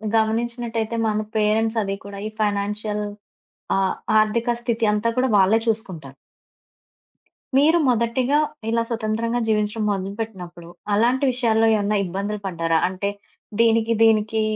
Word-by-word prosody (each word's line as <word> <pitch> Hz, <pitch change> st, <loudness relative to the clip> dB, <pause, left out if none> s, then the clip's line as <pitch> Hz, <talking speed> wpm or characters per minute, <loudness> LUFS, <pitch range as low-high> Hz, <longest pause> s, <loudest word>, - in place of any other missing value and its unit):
గమనించినట్టయితే, 230 Hz, 0 st, -1 dB
మన 215 Hz, 0 st, 0 dB, 0.2 s
పేరెంట్స్ 220 Hz, +1 st, +1 dB
అది 195 Hz, 0 st, -3 dB
కూడా 200 Hz, 0 st, -8 dB
ఈ -, -, -4 dB
ఫైనాన్షియల్ 210 Hz, 0 st, -1 dB, 0.7 s
ఆ -, -, +2 dB, 0.4 s
ఆర్థిక 225 Hz, +3 st, 0 dB
స్థితి 235 Hz, -1 st, -1 dB
అంతా 210 Hz, +2 st, 0 dB
కూడా 260 Hz, +1 st, +2 dB
వాళ్ళే 195 Hz, +3 st, +4 dB
చూసుకుంటారు... 185 Hz, -, -3 dB, 1.4 s
మీరు 310 Hz, +5 st, +5 dB
మొదటిగా 245 Hz, +4 st, +1 dB, 0.3 s
ఇలా 230 Hz, 0 st, +1 dB
స్వతంత్రంగా 230 Hz, +1 st, -1 dB
జీవించడం 215 Hz, 0 st, 0 dB
మొదలుపెట్టినప్పుడు 195 Hz, -3 st, -5 dB, 0.3 s
అలాంటి 245 Hz, +6 st, +2 dB
విషయాల్లో 225 Hz, -3 st, +2 dB
ఏమన్నా 210 Hz, 0 st, 0 dB
ఇబ్బందులు 200 Hz, +4 st, -4 dB
పడ్డారా? 165 Hz, -3 st, 0 dB
అంటే, 190 Hz, +2 st, -3 dB, 0.5 s
దీనికి 230 Hz, 0 st, +3 dB
దీనికి 220 Hz, 0 st, +3 dB
220 Hz, 115 wpm, -22 LUFS, 205-230 Hz, 1.4 s, మీరు